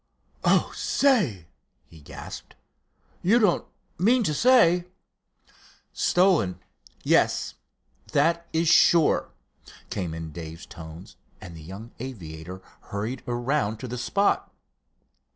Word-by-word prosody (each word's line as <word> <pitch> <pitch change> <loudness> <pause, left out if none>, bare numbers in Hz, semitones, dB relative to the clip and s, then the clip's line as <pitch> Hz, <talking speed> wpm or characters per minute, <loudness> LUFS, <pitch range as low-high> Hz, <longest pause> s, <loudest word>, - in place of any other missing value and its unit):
"Oh, - - +3
say!" 195 - +1 0.4
he 80 -2 -17
gasped, - - -10 0.7
"you 205 +7 +4
don't 210 -7 +2 0.3
mean 235 +6 +4
to 155 - 0
say——" 180 - +4 1.1
"Stolen? 175 - +2 0.4
Yes! - - +2 0.6
That 170 +3 +2
is 165 +1 +1
sure," 165 0 +4 0.6
came 85 -5 -3
in 80 -1 -6
Dave's 80 +1 -8
tones, 80 +2 -11 0.2
and 85 -3 -10
the 80 - -10
young 95 +8 -10
aviator 90 -7 -8 0.3
hurried 110 +6 -4
around 120 -2 -1
to 130 - -7
the 125 - -5
spot. 200 +10 0
120 Hz, 105 wpm, -25 LUFS, -, 1.1 s, you